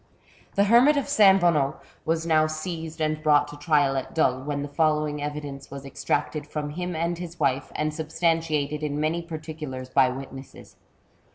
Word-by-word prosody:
The 200 - +4
hermit 240 +8 +5
of 280 - +2
S. 285 -3 -3 0.2
Bonnot 155 -5 +2 0.3
was 165 0 0
now 155 -1 +3
seized 160 0 -5
and 155 0 -1
brought 150 -1 +4
to 145 - -9
trial 145 -2 +2
at 135 - -4
Dole, 130 -5 +2
when 145 +1 -3
the - - -4
following 150 0 0
evidence 145 -1 -5
was 140 0 -8
extracted 145 +2 -2
from 150 -1 -4
him 180 +2 -4
and 170 +1 -1
his 175 -1 -8
wife, 135 0 0
and 155 0 -1
substantiated 155 -2 0
in 150 -1 -2
many 155 +3 0
particulars 155 -6 -7
by 130 0 +4
witnesses. 135 +1 -9
155 Hz, 170 wpm, -25 LUFS, 145-165 Hz, 0.3 s, hermit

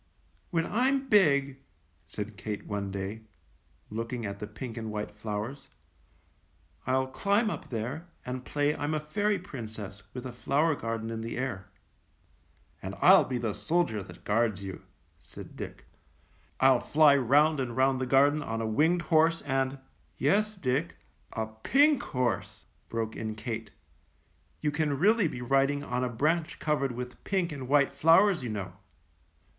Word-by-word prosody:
"When 165 -1 0
I'm 265 +4 +1
big," 140 -9 +4 0.5
said 105 +5 -6
Kate 105 +1 -5
one 100 -1 -3
day, 100 +3 -5 0.7
look 115 +2 -4
ing 120 -3 -3
at 100 0 -5
the 105 - -5
pink 115 +2 -7
and 110 -2 -5
white 105 0 -4
flowers, 105 +5 -5 1.2
"I'U 130 0 +2
climb 200 - +1
up - - -7
there 125 +9 -4 0.2
and 125 0 -4
play 145 +2 0
I'm 145 +2 -2
a - - 0
fairy 205 +7 0
princess 110 - -8
with 125 0 -6
a 130 - -4
flower 140 +7 +1
garden 115 -4 -4
in 110 0 -4
the 115 +1 -5
air." 120 -7 -4 1.1
"And - - -5
I'll - - +7
be 130 - -2
the 115 -3 -2
soldier 165 - 0
that 95 - -12
guards 105 -2 +1
you," 95 -2 -6 0.4
said - - -12
Dick. - - -8 0.7
"I'll 130 -1 +5
fly 150 +1 +5
round 145 +4 +4
and 125 -2 -3
round 130 0 +3
the 130 - -1
garden 140 +3 +4
on 115 -5 -3
a 115 - -1
winged 160 +10 +2
horse 165 0 +3
and 135 -1 0
— - - -36
" - - -38
"Yes, 210 +9 +2
Dick, 125 - -1 0.4
a 110 - -1
pink 270 - +3
horse," 130 - -2 0.2
broke 115 -1 -3
in 110 -1 -4
Kate, 110 -1 -5 0.9
"you 150 - +1
can 150 -2 0
really 205 - +4
be 125 -5 -5
riding 135 +2 +2
on 125 -2 -2
a 125 - 0
branch 155 +7 0
covered 140 -4 0
with 125 +1 -7
pink 185 -4 0
and 135 -4 -6
white 140 0 +3
flowers, 165 +6 +5
you 125 - -4
know." 100 -4 -4
130 Hz, 160 wpm, -29 LUFS, 110-155 Hz, 1.2 s, I'll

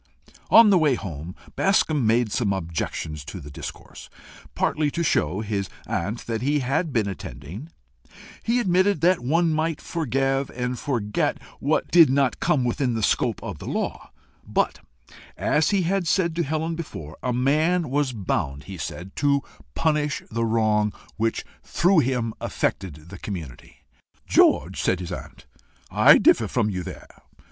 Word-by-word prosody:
On 225 -2 +8
the 185 - +5
way 150 -5 +3
home, 85 -5 -7 0.2
Bascombe 155 - +2
made 115 0 +2
some 105 -4 +1
objections 80 -4 -4
to 75 +6 -7
the 75 -3 -10
discourse, - - -9 0.5
partly 150 -1 +1
to 170 +4 -2
show 95 - +1
his 100 -3 -3 0.2
aunt 100 +7 -3
that 115 -1 -3
he 145 +3 +1
had 140 +6 0
been 110 -5 +1
attending. 95 - -7 0.7
He 235 +2 +1
admitted 190 -2 +2
that 180 +2 +4
one 160 +6 +1
might 155 0 -1
forgive 135 -3 -1
and 125 0 -2
forget 115 -7 -1 0.2
what - - 0
did 170 -4 +7
not 135 -2 +1
come 135 -4 +2
within 125 0 0
the 110 - -2
scope - - +1
of - - -6
the - - -8
law, - - -3 0.3
but, - - 0 0.6
as 150 - +2
he 200 -3 +2
had 185 0 0
said 170 -2 +1
to 170 - +1
Helen 160 +2 -2
before, 80 - -7
a 125 - -1
man 155 +6 +1
was 145 -1 +1
bound, 75 - -2
he 95 -1 -8
said, 90 +4 -6
to 140 -1 +2 0.3
punish 150 -2 0
the 115 +1 0
wrong 110 -2 +2 0.2
which 115 +1 -1 0.2
through 180 0 +3
him 120 -5 0
affected 80 -4 -3
the 95 - -9
community. 80 - -8 0.4
"George," - - +3
said 90 - +1
his 90 -2 -6
aunt, - - -8 0.5
"I - - +7
differ - - +4
from 105 - 0
you 90 -1 -3
there. - - -10
125 Hz, 155 wpm, -24 LUFS, 100-155 Hz, 0.7 s, On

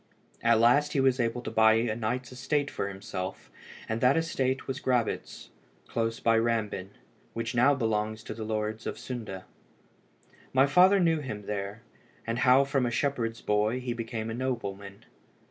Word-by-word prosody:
At 115 -1 +4
last 145 +6 +4
he 140 - +1
was 135 -1 +3
able 120 +1 -1
to - - -5
buy 110 0 +5
a 115 -1 0
knight's 120 +3 -3
estate 140 +3 -1
for - - -3
himself, 95 -1 -6 0.4
and 110 +1 -2
that 130 +4 +4
estate 135 -5 -1
was 135 - -4
Grabitz, 125 -3 -2 0.4
close 115 0 -2
by 115 -1 +3
Rambin, 110 -5 -1 0.4
which 115 +1 -3
now 125 +4 +4
belongs 110 -3 -1
to - - -6
the 110 0 -6
Lords 110 0 -3
of - - -4
Sunde. 110 -7 -6 1.1
My 130 +1 +5
father 180 +7 +5
knew 165 -3 +3
him 110 -8 -6
there, 105 +2 -4 0.4
and 115 +1 -2
how 130 +1 +6
from 135 -2 0
a - - 0
shepherd's 120 -3 -1
boy 105 +4 +1
he 125 -1 -3
became 115 -1 -4
a - - -3
nobleman. 100 -6 -4
115 Hz, 165 wpm, -28 LUFS, 110-130 Hz, 1.1 s, how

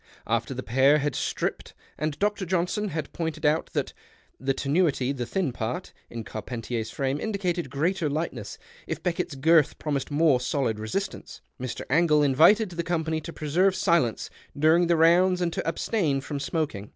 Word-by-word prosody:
After 115 +3 -1
the 130 - -5
pair 135 +5 +4
had 145 -1 -1
stripped - - -3 0.2
and 155 -1 -3
Dr. 205 +1 0
Johnson 185 +4 0
had 155 -5 -4
{)ointed 160 -3 -3
out 150 +2 +2
that - - -2 0.3
" - - -36
the 135 +1 0
tenuity, 140 -3 +1
the 125 -4 -4
thin 185 -8 -1
part 125 +10 -4
" - - -39
in 115 -1 -6
Carpentier's 115 +1 -5
frame 135 +3 -2
indicated 185 -5 -2
greater 160 +3 0
lightness, 140 -9 -4 0.3
if - - -4
Beckett's 170 -3 -2
girth 155 +2 +4
promised 140 -3 -2
more 145 -3 +3
solid 125 -4 -1
resistance, 150 - -4 0.2
Mr. 130 -2 -4
Angle 155 -2 +4
invited 170 - +5
the 170 0 -2
company 160 -2 -1
to 165 - -7
preserve 175 +6 +1
silence 160 - +1 0.3
during 160 +4 +4
the 170 -1 +3
rounds 180 +3 +5
and 175 -2 -1
to - - -3
abstain 165 -4 0
from 140 +1 -5
smoking. 140 - -3
155 Hz, 170 wpm, -26 LUFS, 135-175 Hz, 0.3 s, invited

